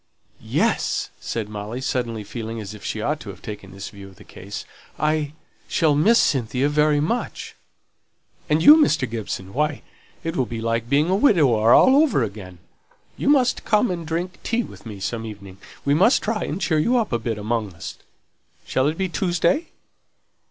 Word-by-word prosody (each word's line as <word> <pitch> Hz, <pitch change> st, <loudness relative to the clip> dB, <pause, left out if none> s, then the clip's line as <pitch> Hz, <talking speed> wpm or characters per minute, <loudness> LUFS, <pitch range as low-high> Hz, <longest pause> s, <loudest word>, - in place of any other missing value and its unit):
"Yes!" -, -, 0 dB
said 110 Hz, -3 st, -4 dB
Molly, 105 Hz, +3 st, -6 dB
suddenly 120 Hz, -4 st, -2 dB
feeling 115 Hz, +1 st, -6 dB
as 105 Hz, -1 st, -7 dB
if 105 Hz, -, -12 dB
she 110 Hz, -, -3 dB
ought 150 Hz, +1 st, -1 dB
to 110 Hz, -, -9 dB
have 95 Hz, -1 st, -11 dB
taken 105 Hz, -2 st, -8 dB
this 95 Hz, +1 st, -7 dB
view 100 Hz, -1 st, -11 dB
of 95 Hz, -, -16 dB
the -, -, -15 dB
case. 100 Hz, +2 st, -8 dB, 0.3 s
"I 150 Hz, -1 st, 0 dB, 0.3 s
shall 155 Hz, -3 st, +2 dB
miss 205 Hz, +11 st, +4 dB
Cynthia 130 Hz, -, +1 dB
very 150 Hz, 0 st, +3 dB
much." 200 Hz, +12 st, -3 dB, 1.0 s
"And 155 Hz, +1 st, +2 dB
you, 300 Hz, -, +10 dB
Mr. 155 Hz, -, +3 dB
Gibson; 100 Hz, -4 st, -5 dB
why, 150 Hz, 0 st, -1 dB, 0.4 s
it'll 165 Hz, -7 st, -1 dB
be 115 Hz, +1 st, -5 dB
like 115 Hz, +1 st, -1 dB
being 150 Hz, +6 st, +3 dB
a -, -, +3 dB
widower 140 Hz, -, +4 dB
over 270 Hz, -, +5 dB
again! 100 Hz, -4 st, -7 dB, 0.6 s
You -, -, -1 dB
must 265 Hz, -4 st, +3 dB
come 210 Hz, 0 st, +2 dB
and 170 Hz, -2 st, -4 dB
drink 170 Hz, +3 st, -4 dB
tea 235 Hz, +1 st, 0 dB
with -, -, -12 dB
me 105 Hz, -3 st, -8 dB
some 115 Hz, +4 st, -3 dB
evening. 100 Hz, -3 st, -9 dB, 0.3 s
We 140 Hz, -, +3 dB
must 195 Hz, -, +4 dB
try 215 Hz, 0 st, -1 dB
and 165 Hz, -, -4 dB
cheer 160 Hz, -4 st, +1 dB
you 240 Hz, +11 st, +2 dB
up 225 Hz, -, -1 dB
a 120 Hz, -, +1 dB
bit 115 Hz, -1 st, -3 dB
amongst 105 Hz, -3 st, -2 dB
us. 85 Hz, -, -8 dB, 0.7 s
Shall 130 Hz, +1 st, +1 dB
it 155 Hz, +2 st, -1 dB
be 190 Hz, -, 0 dB
Tuesday?" 180 Hz, -, 0 dB
135 Hz, 180 wpm, -22 LUFS, 110-170 Hz, 1.0 s, you